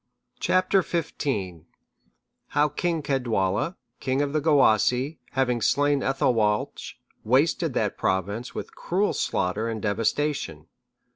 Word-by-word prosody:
Chap. 185 Hz, +1 st, +1 dB
XV. 175 Hz, -4 st, +1 dB, 1.4 s
How 150 Hz, +1 st, +4 dB
King 165 Hz, +2 st, -1 dB
Caedwalla, 120 Hz, -, 0 dB, 0.2 s
king 135 Hz, +2 st, 0 dB
of 140 Hz, 0 st, -3 dB
the 155 Hz, -, +1 dB
Gewissae, 135 Hz, -1 st, +3 dB
having 125 Hz, -3 st, +1 dB
slain 145 Hz, +4 st, +2 dB
Ethelwalch, 115 Hz, -6 st, 0 dB, 0.3 s
wasted 140 Hz, +4 st, +2 dB
that 105 Hz, -2 st, -1 dB
Province 100 Hz, +6 st, -1 dB
with -, -, -6 dB
cruel 195 Hz, +4 st, 0 dB
slaughter 100 Hz, +5 st, -1 dB
and 110 Hz, -1 st, -3 dB
devastation. 110 Hz, -, -1 dB
130 Hz, 110 wpm, -25 LUFS, 110-150 Hz, 1.4 s, How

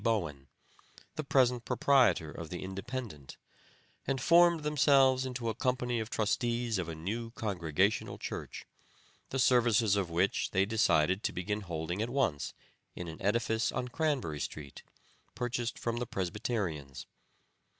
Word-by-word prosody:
Bowen, 85 Hz, -, -1 dB, 0.7 s
the 155 Hz, -, -3 dB
present 125 Hz, -3 st, +2 dB
proprietor 120 Hz, -, +3 dB
of 80 Hz, -1 st, -8 dB
the 90 Hz, -, -5 dB
Independent, 95 Hz, -, -6 dB, 0.7 s
and 135 Hz, 0 st, 0 dB
formed 170 Hz, +2 st, +5 dB
themselves 135 Hz, -3 st, +4 dB
into 125 Hz, -2 st, -4 dB
a 110 Hz, -, 0 dB
company 125 Hz, 0 st, -1 dB
of 110 Hz, 0 st, -4 dB
trustees 115 Hz, 0 st, 0 dB
of 85 Hz, -2 st, -3 dB
a 80 Hz, -, -5 dB
new 110 Hz, +9 st, -4 dB
Congregational 95 Hz, -3 st, -1 dB
Church, -, -, -6 dB, 0.6 s
the 135 Hz, -, -3 dB
services 120 Hz, -5 st, +4 dB
of 100 Hz, -4 st, -1 dB
which 90 Hz, +4 st, +1 dB
they 95 Hz, +1 st, +2 dB
decided 95 Hz, -4 st, +2 dB
to -, -, -1 dB
begin 105 Hz, +4 st, -3 dB
holding 85 Hz, +1 st, -3 dB
at 115 Hz, -, -1 dB
once 120 Hz, -, -1 dB, 0.4 s
in 90 Hz, -, -6 dB
an 80 Hz, -, -8 dB
edifice 110 Hz, +2 st, +1 dB
on 125 Hz, -, -3 dB
Cranberry 130 Hz, -, -1 dB
street, 70 Hz, -1 st, -6 dB, 0.5 s
purchased 120 Hz, 0 st, -2 dB
from 120 Hz, 0 st, -2 dB
the 120 Hz, 0 st, -3 dB
Presbyterians. 85 Hz, -, -3 dB
110 Hz, 140 wpm, -31 LUFS, 90-125 Hz, 0.7 s, formed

